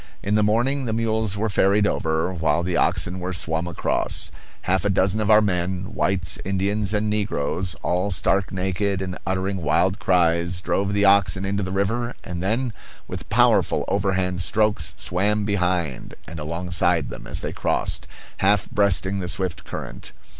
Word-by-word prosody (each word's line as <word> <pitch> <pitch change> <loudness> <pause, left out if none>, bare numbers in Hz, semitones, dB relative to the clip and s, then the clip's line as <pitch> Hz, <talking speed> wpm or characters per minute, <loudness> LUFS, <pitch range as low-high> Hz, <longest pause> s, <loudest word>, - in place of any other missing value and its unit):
In 100 - -1
the 105 - +4
morning 120 +6 +1
the 110 - -1
mules 110 -2 0
were 110 +2 0
ferried 100 0 +3
over, 80 -2 0
while 80 -1 +1
the 90 0 -1
oxen 90 +1 +2
were 90 +1 -3
swum 85 -1 -1
across. 85 - -1 0.3
Half 95 0 +1
a 100 - +1
dozen 100 +2 +2
of 105 - -1
our 110 0 +6
men 95 +1 -2
whites, 95 -4 -1
Indians, 100 +2 0
and 105 0 0
negroes, 95 -4 -1
all 90 +3 0
stark 95 +1 +1
naked 95 +1 -1
and 95 -1 -4
uttering 95 0 -1
wild 90 +5 +1
cries, 85 -1 +2
drove 100 +3 -1
the 100 0 +2
oxen 95 -1 +4
into 100 +1 -1
the 95 -1 -3
river 115 +5 -1
and 90 -2 -5
then, 115 +5 0 0.3
with - - -7
powerful - - +3
overhand 95 -2 0
strokes, 85 -4 +1
swam 105 +3 0
behind 90 - -1
and 85 0 -7
alongside 85 +3 0
them - - -9
as - - -2
they - - -4
crossed, - - -1 0.3
half 105 +2 +2
breasting 100 -1 +1
the 90 - -3
swift 90 -2 -2
current. - - -7
95 Hz, 165 wpm, -23 LUFS, 90-105 Hz, 0.3 s, our